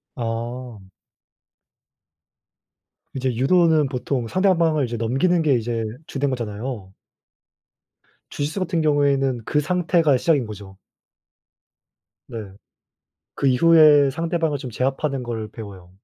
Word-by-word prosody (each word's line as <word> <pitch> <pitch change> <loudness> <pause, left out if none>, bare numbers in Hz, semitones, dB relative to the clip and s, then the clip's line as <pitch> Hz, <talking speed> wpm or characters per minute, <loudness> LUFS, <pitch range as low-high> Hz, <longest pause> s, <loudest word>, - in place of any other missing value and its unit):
아. 120 +1 -5 2.4
이제 130 -2 -1
유도는 160 +2 +3
보통 125 -2 -3
상대방을 165 - +2
이제 120 0 -5
넘기는 135 +10 +1
게 150 -3 +2
이제 115 -1 -2 0.2
주된 140 0 -2
거잖아요. 115 -4 -5 1.4
주짓수 150 +7 -3
같은 170 -2 -1
경우에는 140 -4 +1
그 150 - +1
상태가 170 -3 +2
시작인 140 -2 +1
거죠. 100 -2 -10 1.5
네. 110 -5 -7 0.8
그 140 - -2
이후에 150 0 +6
상대방을 165 -1 -1
좀 130 -3 -7
제압하는 135 +3 -2
걸 110 -2 -5
배워요. 100 -6 -11
135 Hz, 230 characters per minute, -22 LUFS, 115-155 Hz, 2.4 s, 이후에